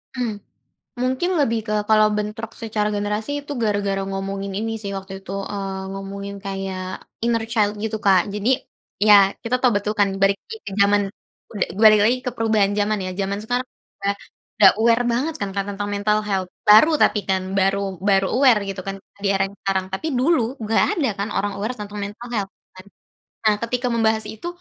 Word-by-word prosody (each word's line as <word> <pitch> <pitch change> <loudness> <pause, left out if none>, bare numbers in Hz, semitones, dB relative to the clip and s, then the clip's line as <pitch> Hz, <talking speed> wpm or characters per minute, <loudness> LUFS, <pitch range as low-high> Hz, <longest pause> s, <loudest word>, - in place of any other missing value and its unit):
Mmm, 240 -4 -2 0.7
mungkin 260 +8 0
lebih 230 -6 +2
ke 215 - -2 0.2
kalau 215 -1 +5
bentrok 210 +2 -4
secara 215 -2 -1
generasi 210 +5 -2 0.2
itu 290 - -4
gara-gara 200 -2 0
ngomongin 195 0 -4
ini 225 +1 -2
sih 200 - -4
waktu 195 0 -7
itu, 190 - -11 0.2
eee, 195 -1 -4
ngomongin 200 +1 -6
kayak 190 -1 -5 0.2
inner 230 -1 +1
child 210 -3 0
gitu 220 +1 -2
Kak 190 -3 +4
jadi 210 +2 -1 0.5
iya 210 0 +8 0.3
kita 230 +2 -1
tahu 250 - +5
betul 205 +1 -2
kan 200 - +5
balik 195 0 +4
lagi 455 -1 -9
ke - - -4
zaman 205 0 +4 0.5
ud 210 - -6 0.2
balik 215 -1 +8
lagi 240 +4 +4
ke 250 - +1
perubahan 220 -4 +2
zaman 210 +1 +1
ya, - - -3
zaman 195 +1 -1
sekarang 245 +3 -1 0.4
udah 200 0 +2 0.5
udah 200 -3 +9
aware 230 +1 +4
banget 285 +7 -1
kan 200 - -1
Kak 200 - 0
tentang 205 0 -4
mental 210 +1 +1
health 190 -3 -1 0.2
baru 215 +10 +8
tapi 210 - +4
kan 190 -1 +1 0.2
baru 195 +1 +2 0.3
baru 195 -1 +4
aware 255 -4 +5
gitu 195 -1 -4
kan 195 - -3 0.3
di 200 - +1
era 195 - +2
yang 195 - -12
sekarang 190 -1 0
tapi 195 - -4
dulu 270 -1 +3 0.2
nggak 220 +1 +2 0.2
ada 285 - +2
kan 200 - -2
orang 205 0 -1
aware 205 +4 -3
tentang 210 0 -7
mental 210 +4 -8
health 200 -3 -2 0.2
kan, 185 - -12 0.6
nah 215 -1 +5
ketika 245 +2 -2
membahas 220 -1 +1
itu 220 +10 -7
210 Hz, 190 wpm, -22 LUFS, 195-225 Hz, 0.7 s, udah